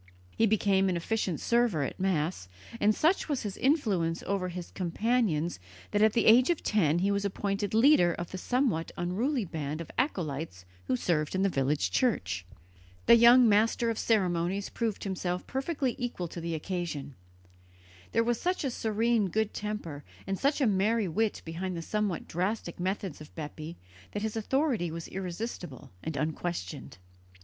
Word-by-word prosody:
He 225 - +3
became 195 -2 +3
an 180 - 0
efficient 185 -1 -1
server 235 -10 +2
at 135 - -5
Mass, 165 - -1 0.3
and 210 +1 +3
such 330 +2 +2
was 280 -5 -1
his 205 -3 -4
influence 205 - +1
over 190 -2 -1
his 175 -1 -7
companions 180 - 0 0.3
that 205 - +1
at 215 0 +5
the 230 - +2
age 245 +5 +7
of 345 - 0
ten 170 -7 +2
he 195 +3 +2
was 200 0 0
appointed 200 +1 -2
leader 225 - +6
of 175 - -6
the 185 - -5
somewhat 245 - 0
unruly 220 +8 0
band 155 -2 -4
of 170 - -7
acolytes 155 - -2 0.2
who 130 - +2
served 155 +4 0
in 190 - +1
the 195 - +3
village 140 -1 0
church. 95 - 0 0.6
The - - +8
young 240 +1 +8
master 225 +2 +3
of 225 - -4
ceremonies 190 -2 +1
proved 225 -4 -2
himself 180 -2 -2
perfectly 270 -1 -1
equal 240 -8 -3
to 170 - -7
the 165 0 -2
occasion. 155 -4 -4 1.0
There 230 - +3
was 235 0 0
such 360 -1 0
a 270 - -1
serene 225 -2 +1
good 220 +3 0
temper 205 -9 -5 0.2
and 195 - -1
such 285 +2 +1
a - - +4
merry 210 +1 +2
wit 215 +6 -1
behind 175 +2 -4
the 165 - -4
somewhat 210 -2 -2
drastic 180 +1 -2
methods 185 -3 -3
of 150 - -13
Bepi 155 +1 -7 0.4
that 205 - -3
his 220 0 -2
authority 235 - 0
was 165 +1 -6
irresistible 180 - -6
and 160 -2 -4
unquestioned. 155 - -4
195 Hz, 165 wpm, -29 LUFS, 170-225 Hz, 1.0 s, The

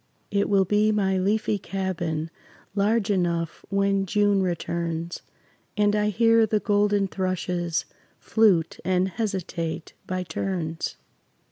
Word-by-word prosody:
It 200 0 +1
will 195 -2 +4
be 210 +3 +3
my 195 -3 +1
leafy 205 +2 +1
cabin, 170 -5 -3 0.4
Large 210 +1 +1
enough 170 -4 -1
when 195 0 +1
June 205 -1 +3
returns 170 -1 -2 0.6
And 205 0 +3
I 210 0 +2
hear 225 +1 +4
the 215 0 +1
golden 205 -1 +2
thrushes 180 -3 -2 0.3
Flute 195 -8 +2
and 185 +1 +1
hesitate 185 -6 -3
by 185 0 -2
turns. 170 -3 -3
195 Hz, 115 wpm, -25 LUFS, 175-205 Hz, 0.6 s, will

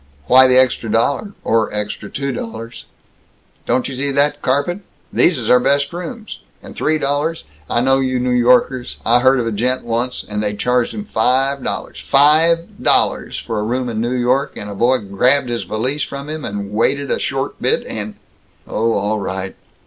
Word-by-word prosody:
"Why 130 +1 +7
the 130 0 +4
extra 125 -3 +2
dollar 140 - 0
or 110 -1 +1
extra 105 0 -4
two 140 0 -3
dollars?" 115 -1 -7 0.8
"Don't 130 - +1
you 135 - -6
see 140 +2 -1
that 145 +1 +1
carpet? 145 +8 0 0.3
These 170 -3 +3
is 115 -4 -4
our 125 - +6
best 140 +4 +1
rooms. 215 +6 -7 0.2
And - - -11
three 155 0 +1
dollars 145 +3 -1 0.3
I 120 - +1
know 135 +1 +3
you 130 -1 0
New 125 0 0
Yorkers. 125 +1 +2
I 120 +2 +4
heard 130 +1 +4
of 120 - -1
a 115 - -1
gent 125 +5 -1
once, 120 +2 -2
and 105 0 -3
they 105 -1 -2
charged 125 +3 0
him 210 - -4
five 135 - +1
dollars - - -4
five 160 +4 +3
dol - - +4
lars! - - -8
for 110 -2 -4
a - - -1
room 125 +3 -2
in 110 -1 -2
New 120 +2 -1
York, 125 +3 0
and 105 0 -6
a - - -5
boy 120 +6 +2
grabbed 125 +6 +1
his 120 -1 -2
valise 130 +7 -2
from 140 +1 -5
him 155 -1 -5
and 100 0 -5
wanted 135 +6 0
a - - 0
short - - -3
bit - - +1
and 105 -1 -6 0.3
" - - -37
"Oh 115 +1 0
all 105 +2 -1
right! 95 -1 -4
125 Hz, 195 wpm, -18 LUFS, 115-140 Hz, 0.8 s, Why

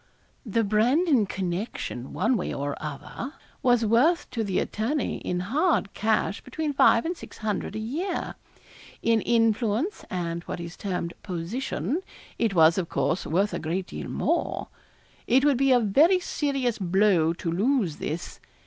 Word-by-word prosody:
The 225 +2 +1
Brandon 240 - +3
connection, 180 - -4
one 215 - +1
way 190 - -2
or 145 0 -3
other, 155 - -6 0.3
was 245 -2 +3
worth 255 +11 +3
to 230 - -1
the 195 -3 -1
attorney 245 +7 -1
in 180 0 -2
hard 275 - +1
cash 215 -2 0
between 295 +3 -3
five 230 -2 +5
and 345 +2 -1
six - - -12
hundred 210 -1 -3
a - - -2
year. 320 - -3 0.7
In 230 -1 +3
influence, 230 - +1
and 170 -2 -3
what - - -5
is 170 0 -7
termed 180 -3 -3
'position,' 190 - -3 0.4
it 220 -4 +1
was, 165 +1 +6
of 170 - -3
course, 175 +1 0
worth 195 +6 +1
a - - -2
great 175 +4 -2
deal - - -7
more. - - -1 0.6
It 265 +3 +4
would 285 -4 +4
be 270 +1 +3
a 250 - +6
very 290 - +4
serious 275 -9 -1
blow 185 -3 +3
to 170 -1 -3
lose 200 - +1
this. 160 +3 -5
215 Hz, 155 wpm, -26 LUFS, 180-260 Hz, 0.7 s, was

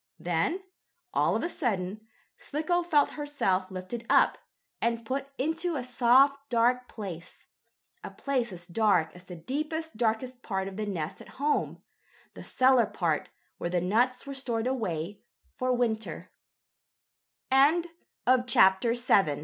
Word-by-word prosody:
Then, 175 - -1 0.5
all - - +2
of - - -1
a - - +1
sudden, 215 - -3 0.3
Slicko 315 +4 -1
felt 315 -5 +3
herself 195 -11 -1
lifted 190 +5 -6
up, - - +4 0.4
and 230 0 0
put 270 +3 -3
into 325 +4 -1
a 265 - -2
soft, 265 +3 +3
dark 245 +1 +2
place 180 -6 -8 0.6
a - - -5
place 255 -5 -2
as 175 -1 -10
dark 180 -3 +2
as 180 0 -14
the 180 - -9
deepest, 310 - -4
darkest 245 +2 -1
part 190 -4 -2
of 195 - -7
the 210 +1 -3
nest 165 -6 -4
at - - -14
home 290 +2 -1 0.5
the - - -10
cellar 255 -3 +4
part 165 -4 -1 0.3
where 170 - -2
the 180 0 +1
nuts 235 +9 +1
were 280 - -6
stored 245 -4 -2
235 Hz, 120 wpm, -28 LUFS, 190-275 Hz, 0.6 s, up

